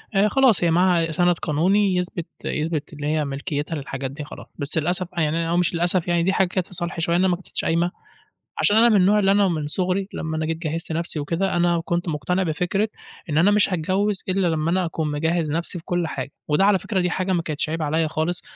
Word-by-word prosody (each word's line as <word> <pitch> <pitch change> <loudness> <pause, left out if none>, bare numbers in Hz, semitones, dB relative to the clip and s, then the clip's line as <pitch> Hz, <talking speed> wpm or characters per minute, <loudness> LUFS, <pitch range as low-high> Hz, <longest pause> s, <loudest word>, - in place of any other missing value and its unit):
آآ 200 +2 +4
خلاص 260 -8 +4
هي 170 - +3
معاها 175 -1 +3
سَنَد 175 +2 +2
قانوني 185 +5 +2
يثبت 180 -2 -2 0.2
يثبت 155 0 -2
اللي 145 0 -5
هي 155 -1 0
ملكيتها 145 +3 -3
للحاجات 135 -2 -5
دي 150 +2 -7
خلاص، - - -10
بس 140 +3 -1
للأسف 175 +3 0
بقى 170 -3 -1
يعني 155 +2 0
أنا 165 0 -1
أو 170 - +1
مش 180 0 +1
للأسف 175 +1 +1
يعني 170 -1 +2
دي 190 +2 +2
حاجة 190 - +2
كانت 185 0 -2
في - - -13
صالحي 175 -1 -3
شوية، 170 +1 +1
إن 180 - +3
أنا 190 - +4
ما 175 - +2
كتبتش - - -5
قايمة، 170 +2 +1 0.7
عشان 205 +1 +4
أنا 235 +1 +6
من 215 - +4
النوع 200 +2 +4
اللي 195 -1 +3
أنا 200 -1 +4
من 155 -4 -2
صغري 185 +4 -1
لمّا 160 -1 -3
أنا 155 - -1
جيت 165 0 -2
جهِّزت 165 0 -3
نفسي 165 -1 -2
وكده 170 +6 -1
أنا 175 -1 +2
كنت 175 0 -1
مقتنع 180 +6 -1
بفكرة 180 +6 0 0.4
إن 150 - 0
أنا 190 +5 +5
مش 205 -2 +3
هاتجوز 190 +4 0
إلّا 185 -1 +1
لمّا 160 0 0
أنا 185 -1 +1
أكون 160 -2 -2
مجهّز 160 +1 0
نفسي 170 +2 -3
في - - -18
كُلّ 175 -2 -1
حاجة، 135 -1 -5 0.2
وده 150 +6 +3
على 200 -2 +4
فكرة 195 -2 -1
دي 180 - +1
حاجة 185 +1 -1
ما 170 - +1
كانتش 155 -1 -2
عيب 165 0 -2
عليَّ 155 +1 +1
خالص، 160 +3 -2
170 Hz, 240 wpm, -23 LUFS, 160-185 Hz, 0.7 s, أنا